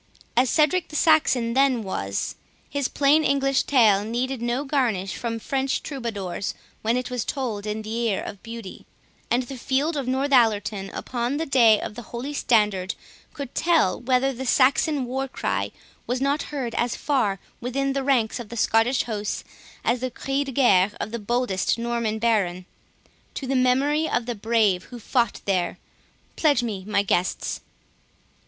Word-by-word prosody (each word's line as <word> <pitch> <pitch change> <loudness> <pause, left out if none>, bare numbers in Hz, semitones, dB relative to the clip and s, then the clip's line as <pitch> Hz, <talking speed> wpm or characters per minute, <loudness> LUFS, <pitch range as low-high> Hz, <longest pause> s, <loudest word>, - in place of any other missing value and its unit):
As 250 +1 +4
Cedric 320 +3 +2
the 305 - -10
Saxon 280 -7 +3
then 265 -3 +3
was, 100 - -3 0.3
his 280 -2 -1
plain 290 +2 +3
English 275 -2 +2
tale 215 -7 +4
needed 245 +3 -2
no 240 +3 -1
garnish 235 -10 0
from 230 -1 -3
French 270 +3 -1
troubadours, 215 - -4 0.3
when 230 +3 +1
it 250 0 -3
was 250 -2 -1
told 225 -7 -3
in 215 +1 -3
the 215 +1 -5
ear 195 - 0
of 200 - -7
beauty; 230 -4 -9 0.4
and 245 +2 +2
the 255 +1 -8
field 280 +6 0
of 275 -3 -3
Northallerton, 225 -7 +2
upon 245 +2 -2
the 325 - -1
day 235 -7 +5
of - - -5
the 240 - -7
Holy 240 +5 -6
Standard, 210 -8 +1 0.4
could 280 -3 -6
tell 325 - +2
whether 260 +2 +2
the 260 +1 -5
Saxon 275 +2 +3
war 265 +2 -2
cry - - -2 0.4
was 245 +1 -1
not 280 +3 +1
heard 260 -6 -3
as 240 0 0
far 215 -10 0 0.2
within 270 +3 -1
the 275 0 -1
ranks 255 -4 +1
of 230 -3 -8
the 235 - -7
Scottish 225 +4 +3
host 210 -3 -3 0.4
as 240 +1 +1
the 255 +1 -2
'cri 270 +3 -2
de 270 - -5
guerre' 205 -7 +4
of 215 - -4
the 235 - -3
boldest 235 -3 0
Norman 235 -2 -1
baron. 200 -6 +1 0.7
To 275 - -4
the 270 +1 -1
memory 275 +5 +2
of 240 - 0
the 240 - -2
brave 215 -4 +1
who 245 - -10
fought 235 +1 0
there!—Pledge 200 - -1
me, 200 -5 -4
my 205 -1 +2
guests." 185 -2 -1
240 Hz, 165 wpm, -24 LUFS, 215-270 Hz, 0.7 s, day